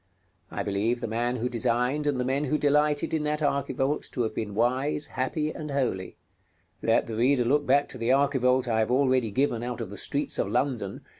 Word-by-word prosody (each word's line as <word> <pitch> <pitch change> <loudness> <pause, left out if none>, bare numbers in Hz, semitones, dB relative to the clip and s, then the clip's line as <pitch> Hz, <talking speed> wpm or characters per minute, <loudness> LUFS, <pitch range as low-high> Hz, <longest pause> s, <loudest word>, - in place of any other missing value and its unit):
I - - -3
believe 105 +4 0
the 120 - -3
man 120 +3 -1
who 125 0 -1
designed 125 +4 0
and 140 -3 0
the 125 - 0
men 135 +3 0
who 150 +2 +1
delighted 150 +1 +2
in 160 - +1
that 150 +1 -1
archivolt 140 0 0
to 125 - 0
have 110 - -2
been 105 -2 -4
wise, 130 +6 +1
happy, 150 +4 -2
and 150 -1 -7
holy. 125 -10 -2 0.6
Let - - +2
the 115 - -5
reader 125 +2 +3
look 145 +4 +2
back 140 +2 +4
to 130 - -9
the 115 +1 -1
archivolt 130 -2 +2
I 110 -2 +1
have 110 - +1
already 130 -2 +2
given 120 +1 0
out 120 0 -4
of 110 -5 -5
the 105 - -8
streets 140 +1 -2
of - - +1
London 135 -3 0
(Plate 100 -3 -5
XIII. - - -10
Vol. - - -30
130 Hz, 225 wpm, -27 LUFS, 120-145 Hz, 0.6 s, back